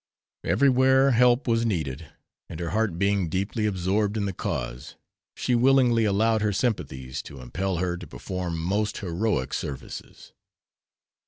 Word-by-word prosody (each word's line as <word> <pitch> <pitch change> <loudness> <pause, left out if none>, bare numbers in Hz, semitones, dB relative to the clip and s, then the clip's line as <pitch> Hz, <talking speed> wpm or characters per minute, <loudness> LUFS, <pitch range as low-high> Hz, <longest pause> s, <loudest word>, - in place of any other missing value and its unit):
Everywhere 130 0 +4
help 125 +2 +4
was 115 -1 +2
needed, 80 - -2 0.4
and 80 - -7
her 85 -1 -3
heart 110 -5 0
being 100 -2 +1
deeply 100 +5 -1
absorbed 100 +2 0
in 100 - 0
the 100 - -2
cause 60 -7 -4 0.4
she 125 - -1
willingly 120 -2 +4
allowed 110 +2 +2
her 105 0 +1
sympathies 65 - -2
to 70 - -11
impel 95 +10 -3
her 90 0 -1
to 90 - -9
perform 90 -3 -4
most 100 +6 -1
heroic 85 -7 -1
services. 70 -2 -7
100 Hz, 140 wpm, -26 LUFS, 85-115 Hz, 0.4 s, Everywhere